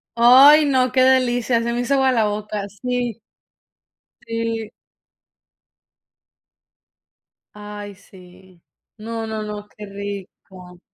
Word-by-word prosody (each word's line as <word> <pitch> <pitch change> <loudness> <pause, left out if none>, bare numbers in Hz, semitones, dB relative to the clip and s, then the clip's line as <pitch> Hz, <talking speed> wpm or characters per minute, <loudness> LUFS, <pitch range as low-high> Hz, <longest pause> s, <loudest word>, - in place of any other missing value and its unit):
Ay, 270 +6 +7
no, 260 -3 +1
qué 260 - +2
delicia, 245 -2 +2
se 235 - -2
me 240 - -2
hizo 245 +3 -1
agua 265 -1 +2
la 230 -4 +1
boca. 210 0 -4 0.2
Sí. 245 -3 -3 1.1
Sí. 230 -1 -4 2.9
Ay, 205 -1 -9
sí. 185 -2 -19 0.4
No, 225 +1 -6
no, 220 -1 -4
no, 210 0 -8
qué 210 - -9
rico. 195 -2 -10
225 Hz, 105 wpm, -20 LUFS, 205-245 Hz, 2.9 s, Ay